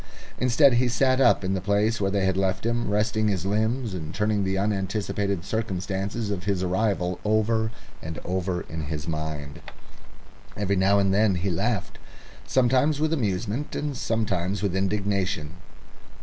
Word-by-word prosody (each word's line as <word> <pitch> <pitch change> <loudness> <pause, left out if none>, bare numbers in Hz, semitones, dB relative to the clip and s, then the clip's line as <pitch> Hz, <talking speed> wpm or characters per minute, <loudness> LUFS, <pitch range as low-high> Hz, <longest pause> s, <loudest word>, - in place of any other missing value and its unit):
Instead, 125 +2 +5
he 125 +1 +3
sat 130 +2 +2
up 120 -5 +4
in 95 +1 0
the 95 - -1
place 105 +3 +1
where 95 - +2
they 100 -1 +1
had 95 -1 +1
left 95 +2 0
him, 120 0 0
resting 110 +1 +1
his 95 -3 -1
limbs 110 +3 0
and 80 -2 -6
turning 105 -1 +1
the 95 0 0
unanticipated 100 -1 -1
circumstances 100 0 -2
of 90 -3 -4
his 100 -3 0
arrival 90 -1 0
over 110 +1 +2 0.3
and 80 -1 -6
over 90 -1 -1
in 80 -2 -6
his 75 -1 -5
mind. 75 -3 -4 1.0
Every 100 -1 0
now 95 +2 +4
and 100 -1 +3
then 105 -1 +3
he 90 +2 -1
laughed, 100 +4 -2 0.5
sometimes 130 +4 +3
with 155 +1 +1
amusement, 110 - -2
and 145 -2 -2
sometimes 100 -5 -1
with 95 -3 0
indignation. 95 -5 -1
100 Hz, 155 wpm, -25 LUFS, 95-110 Hz, 1.0 s, Instead